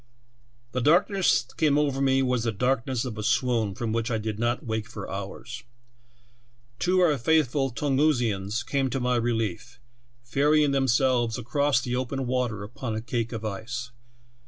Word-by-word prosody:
"The 130 - -1
darkness 175 - +3
that 120 - -20
came 150 -3 +3
over 140 -2 +1
me 135 0 +3
was 125 -2 0
the 115 - 0
dark 125 +3 0
ness 130 -2 -1
of 110 -4 -5
a - - -3
swoon, 115 -2 +1
from 115 0 -2
which 115 +1 -1
I 115 - 0
did 110 -1 -4
not 120 +5 -1
wake 110 -1 -2
for 115 -4 -7
hours. 110 +5 -6 1.2
Two 185 0 +3
of 170 - +5
our 145 - 0
faithful 140 -1 +2
Tungusians 120 -6 0
came 135 0 0
to 135 +2 -2
my 125 0 +1
relief, 115 -4 -2 0.4
ferrying 145 +4 +3
themselves 130 -3 +2
across 140 +2 +1
the 125 0 -2
open 130 +1 -2
water 120 -5 -1
upon 110 +2 -5
a 110 - -3
cake 120 -1 -2
of 115 -2 -5
ice. 115 +5 -5
125 Hz, 170 wpm, -26 LUFS, 115-135 Hz, 1.2 s, of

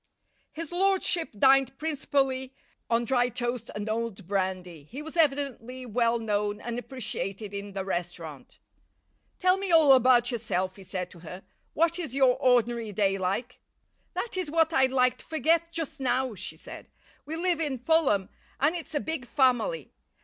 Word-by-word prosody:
His 330 0 -7
lordship 365 -2 +2
dined 270 +2 +4
principally 270 -4 -1 0.3
on 235 +1 +2
dry 245 -1 +2
toast 240 -1 -3
and 210 0 -4
old 220 -3 -3
brandy. 185 -5 -2
He 270 - -8
was 315 +1 -9
evidently 275 -5 0
well 235 0 +1
known 210 -2 -1
and 235 +2 -4
appreciated 215 -4 -5
in 200 0 -6
the 190 -1 -4
restaurant. 175 -5 -5 0.8
"Tell 370 0 +3
me 390 -2 -2
all 315 -4 +7
about 250 -1 +5
yourself," 190 -5 -2
he 195 - -11
said 185 -1 -5
to 175 - -14
her. 180 +3 -9 0.3
"What 335 +2 +2
is 315 -7 -3
your 260 -2 +4
ordinary 240 -4 +2
day 195 -1 +1
like?" 200 +7 -2 0.6
"That 470 - -3
is 365 -5 -2
what 325 +1 +2
I'd 265 -4 +4
like 255 -1 +2
to - - -12
forget 320 +2 +1
just 320 -4 -4
now," 260 -1 0
she 200 - -6
said. - - -10 0.4
"We 315 - -4
live 345 0 +1
in 290 -5 -1
Fulham, 250 - +2 0.3
and 295 +5 +2
it's 330 -2 -7
a - - +2
big 305 -5 -4
family. 265 - +1
250 Hz, 165 wpm, -28 LUFS, 210-305 Hz, 0.8 s, all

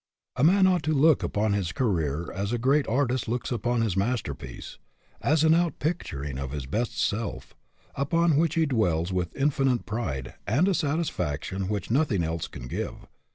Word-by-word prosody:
A 125 - 0
man 190 +4 +6
ought 185 -2 +3
to 155 - +1
look 150 +1 +5
upon 105 0 0
his 95 -4 -1
career 85 - -1
as 100 +3 -2
a 120 - +1
great 135 +5 +2
artist 130 0 0
looks 120 +3 -2
upon 120 0 0
his 105 -6 0
masterpiece, 100 - -3 0.4
as 155 +1 +3
an 160 - +5
outpicturing 155 - -1
of 70 0 -5
his 70 -3 -4
best 110 - -2
self, 105 +1 -2 0.4
upon 165 +4 +2
which 165 +2 +2
he 165 -1 +3
dwells 95 - +1
with 90 -3 -2
infinite 135 -3 +1
pride 75 - -3
and 140 - +3
a 195 - +3
satisfaction 95 - -2
which 105 -1 -3
nothing 120 - +2
else 80 0 -2
can 60 - -9
give. - - -5
115 Hz, 170 wpm, -27 LUFS, 90-150 Hz, 0.4 s, man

